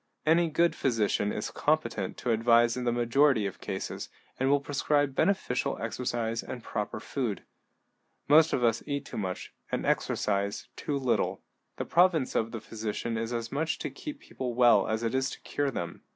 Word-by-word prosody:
Any 165 +2 +4
good 170 +2 +2
physician 105 -4 +1
is - - -3
competent - - 0
to 125 - -1
advise 115 +1 +4
in 125 -1 -3
the 120 - +2
majority 120 0 +3
of 100 - -5
cases, - - -4 0.3
and 130 +1 +2
will 145 0 +4
prescribe 145 0 +1
beneficial 135 -6 +1
exercise 115 -1 -2
and 125 -2 -7
proper 105 +1 -3
food. 115 -3 -3 0.8
Most 155 +2 +6
of 125 - 0
us 115 -1 +3
eat 140 -1 -2
too - - -6
much, 95 -3 -4 0.2
and - - -1
exercise 100 0 0
too 145 - -2
little. 130 -3 0 0.3
The - - -3
province 170 -6 +3
of 115 0 0
the 115 - -5
physician 110 +1 -4
is 115 +1 -2
as 115 -1 -3
much 155 +3 -1
to - - -4
keep 295 -2 -7
people 125 -2 -5
well 120 -5 +5
as 110 +1 -1
it 115 - -1
is 130 0 +1
to - - -9
cure 145 -1 -1
them. 85 -9 -5
120 Hz, 180 wpm, -29 LUFS, 115-140 Hz, 0.8 s, Most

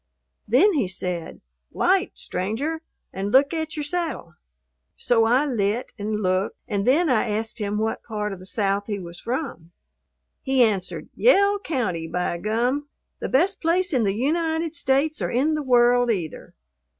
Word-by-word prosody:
Then 295 - +5
he 265 - +1
said, 180 -2 -4 0.3
"Light, - - +1
stranger, 275 - -3 0.3
and 195 +2 -3
look 280 +5 +4
at 315 -1 -3
your 300 - -2
saddle." 320 - -3 0.6
So 225 -2 +2
I 250 +6 +3
"lit" 230 -3 -1
and 210 +1 -2
looked, 185 +1 0
and 200 -1 -2
then 315 +7 +4
I 245 -4 +2
asked 220 +2 -2
him 210 0 -2
what 220 +1 -1
part 210 -2 -4
of 190 - -9
the 185 - -11
South 200 0 0
he 205 -2 -2
was 175 -2 -8
from. 235 - -4 0.7
He 265 -1 +3
answered, 200 -5 -1
"Yell 405 -4 +4
County, 210 - -2
by 175 0 -2
gum! 245 +8 0 0.3
The - - -4
best 365 +9 +2
place 355 +1 +1
in 250 -4 +2
the 195 -1 0
United 320 +5 0
States, 300 -1 0
or - - -1
in 280 +6 +1
the 305 - -1
world, 245 -2 +4
either." 180 -8 -3
240 Hz, 160 wpm, -24 LUFS, 200-300 Hz, 0.7 s, Then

